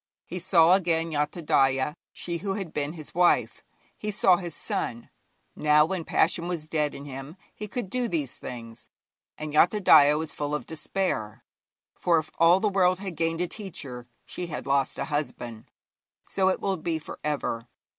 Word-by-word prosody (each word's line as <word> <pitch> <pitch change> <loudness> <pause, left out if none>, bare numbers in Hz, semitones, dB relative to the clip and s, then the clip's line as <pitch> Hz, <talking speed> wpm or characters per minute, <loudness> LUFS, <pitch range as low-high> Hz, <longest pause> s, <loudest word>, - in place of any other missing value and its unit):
He 180 - -5
saw 175 -1 +5
again 165 -3 +1
Yathodaya, 145 -3 +1 0.2
she 170 -1 -4
who 195 +1 -2
had 195 -6 -5
been 145 +1 -2
his 155 -3 -8
wife; 175 0 +2 0.3
he 210 - -5
saw 190 -3 +4
his 175 -4 -6
son. 115 0 -3 0.4
Now, 150 0 +4
when 170 -1 -3
passion 170 0 +2
was 170 -4 -3
dead 150 -2 -1
in 140 - -8
him, 135 +4 -8 0.2
he 210 - -7
could 240 0 -4
do 245 +5 -1
these 150 - -2
things. 115 -2 -9 0.5
And 155 -1 -5
Yathodaya 155 -4 +6
was 160 0 -4
full 145 0 -2
of 150 - -4
despair, 155 - -3 0.5
for 170 -2 +2
if 155 -1 -2
all 170 +3 +6
the 215 - +1
world 185 -2 +3
had 190 -2 -6
gained 165 +1 -1
a 180 - 0
teacher, 140 - -7 0.2
she 180 - -5
had 150 - -5
lost 140 -1 +1
a - - -2
husband. 125 -7 -4 0.6
So 190 -1 +1
it 185 - 0
will 195 -1 -1
be 165 0 -2
for 155 - -9
ever. 135 -6 -2
160 Hz, 175 wpm, -27 LUFS, 145-180 Hz, 0.6 s, Yathodaya